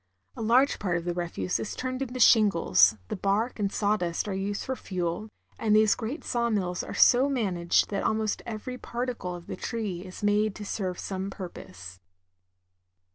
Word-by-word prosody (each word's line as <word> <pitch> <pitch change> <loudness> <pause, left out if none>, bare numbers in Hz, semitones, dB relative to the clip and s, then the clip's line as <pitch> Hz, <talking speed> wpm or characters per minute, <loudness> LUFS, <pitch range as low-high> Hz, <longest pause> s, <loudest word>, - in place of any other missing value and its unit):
A - - -7
large 245 +5 +3
part 180 -4 0
of 170 - -5
the 175 - -1
refuse 170 - -2
is 110 - -4
turned 255 0 -3
into 255 -1 -4
shingles, 165 - +5
the - - -2
bark 205 +5 0
and 200 -1 0
sawdust 200 -5 0
are 200 - -2
used 200 +2 -2
for 260 - -3
fuel, 180 0 -3 0.3
and 215 -2 +3
these 215 -1 +5
great 245 +7 -5
saw 235 -1 0
mills 180 -5 -1
are - - -7
so 255 +3 +5
managed 190 -12 +1
that 200 - -1
almost 220 -1 0
every 240 +3 -6
particle 240 -8 -4
of 175 -1 -10
the - - -5
tree 215 -7 -3
is 185 +1 -10
made 205 0 +2
to 210 - -7
serve 185 -3 -3
some 190 0 -4
purpose. 90 - -9
205 Hz, 180 wpm, -27 LUFS, 180-230 Hz, 0.3 s, shingles